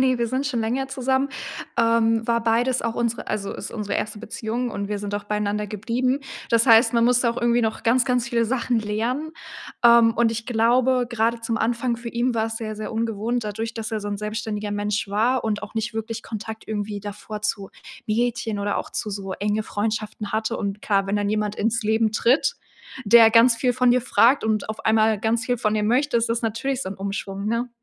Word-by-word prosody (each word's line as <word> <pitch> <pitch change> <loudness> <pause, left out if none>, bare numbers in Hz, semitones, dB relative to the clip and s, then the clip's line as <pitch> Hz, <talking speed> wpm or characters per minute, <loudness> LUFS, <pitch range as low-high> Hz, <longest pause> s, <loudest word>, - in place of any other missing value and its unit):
Ne, 260 -1 +3
wir 235 - +1
sind 260 +4 -1
schon 250 -5 -1
länger 250 +5 -1
zusammen. 265 0 0 0.5
Ähm, 230 -1 +3
war 235 0 +1
beides 240 +3 +1
auch 230 -1 -2
unsere 235 -1 -2
also, 205 -2 -3
ist - - -7
unsere 210 -3 -3
1. 210 0 -4
Beziehung 235 +1 -4
und 200 -2 -4
wir 205 0 -2
sind 205 0 -4
auch 205 0 -3
beieinander 210 0 -1
geblieben. 245 +6 -1 0.3
Das 230 +1 +3
heißt, 230 +1 +6
man 235 -1 +3
musste 245 0 +3
auch 230 - -2
irgendwie 240 0 +3
noch 220 -1 -2
ganz, 240 +2 +3
ganz 250 -2 0
viele 235 -2 +1
Sachen 240 0 0
lernen. 235 +9 -2 0.5
Ähm, 235 -1 +7
und 230 -1 +3
ich 225 0 -5
glaube, 245 +2 +2
gerade 235 0 0
zum 230 0 -2
Anfang 235 +2 0
für 235 0 -7
ihn 240 +1 0
war 220 -1 +1
es 225 0 -5
sehr, 220 -1 -4
sehr 215 +1 -5
ungewohnt, 225 +1 -1
dadurch, 220 +2 -4
dass 225 -1 -5
er 220 - -1
so 205 - -5
'n 205 - -2
selbstständiger 210 0 -4
Mensch 205 0 -2
war 230 +6 +1
und 210 -2 -1
auch 210 - -8
nicht 225 0 -2
wirklich 225 0 -4
Kontakt 220 0 -7
irgendwie 205 -1 -3
davor 210 +1 -7
zu 200 -2 -2 0.4
Mädchen 225 -1 -1
oder 200 0 -1
auch - - -6
zu 215 - -4
so 195 -1 -5
enge 210 +2 -1
Freundschaften 215 -1 -3
hatte. 220 +1 -1
Und 200 0 -3
klar, 195 -2 +1
wenn 200 +1 0
dann 205 0 0
jemand 210 0 -1
ins 225 +2 0
Leben 220 0 +1
tritt, 245 +6 +2 0.5
der 225 +1 +7
ganz 230 +1 +6
viel 250 +2 +1
von 250 0 +3
dir 250 +1 +4
fragt 245 +2 +4
und 215 -1 0
auf 220 - -6
einmal 220 -1 +3
ganz 225 +2 0
viel 245 0 -1
von 215 -1 0
dir 215 - 0
möchte, 250 +6 +2
ist 230 0 +1
das 230 +1 -1
natürlich 240 +4 -1
so - - -5
'n 190 - -5
Umschwung, 195 0 -4
ne? 230 +3 -1
225 Hz, 220 wpm, -23 LUFS, 210-235 Hz, 0.5 s, Ähm